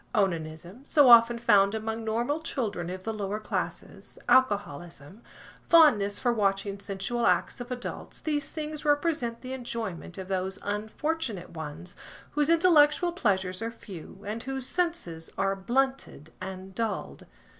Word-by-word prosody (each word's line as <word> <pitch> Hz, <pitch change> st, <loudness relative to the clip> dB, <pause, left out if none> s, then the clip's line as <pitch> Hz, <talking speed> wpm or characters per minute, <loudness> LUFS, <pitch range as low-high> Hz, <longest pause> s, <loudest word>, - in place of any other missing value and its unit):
Onanism, 175 Hz, -, -2 dB
so 285 Hz, -2 st, +5 dB
often 235 Hz, 0 st, +8 dB
found 205 Hz, -3 st, +4 dB
among 220 Hz, +1 st, -3 dB
normal 235 Hz, +7 st, 0 dB
children 215 Hz, -, -3 dB
of 185 Hz, +1 st, -6 dB
the 225 Hz, -, -3 dB
lower 210 Hz, 0 st, -3 dB
classes, 215 Hz, -, -5 dB
alcoholism, 185 Hz, -, +1 dB, 0.5 s
fondness 215 Hz, -12 st, +6 dB
for 245 Hz, -2 st, +1 dB
watching 200 Hz, -2 st, 0 dB
sensual 200 Hz, +5 st, -2 dB
acts -, -, +1 dB
of 245 Hz, -, -7 dB
adults–these 290 Hz, +4 st, -4 dB
things 305 Hz, -1 st, -5 dB
represent 290 Hz, -6 st, +1 dB
the 255 Hz, 0 st, -6 dB
enjoyment 230 Hz, -9 st, -5 dB
of 190 Hz, -1 st, -6 dB
those 190 Hz, 0 st, -2 dB
unfortunate 215 Hz, -, -3 dB
ones 160 Hz, +2 st, -7 dB, 0.4 s
whose 295 Hz, +1 st, +1 dB
intellectual 335 Hz, -1 st, +5 dB
pleasures 190 Hz, -, 0 dB
are 225 Hz, -, -2 dB
few, 195 Hz, -4 st, -11 dB
and 215 Hz, +3 st, -4 dB
whose 265 Hz, 0 st, -4 dB
senses 295 Hz, -, -2 dB
are 195 Hz, 0 st, +1 dB
blunted 240 Hz, -, -1 dB
and 190 Hz, 0 st, -7 dB
dulled. 200 Hz, -, -4 dB
220 Hz, 135 wpm, -28 LUFS, 190-265 Hz, 0.5 s, often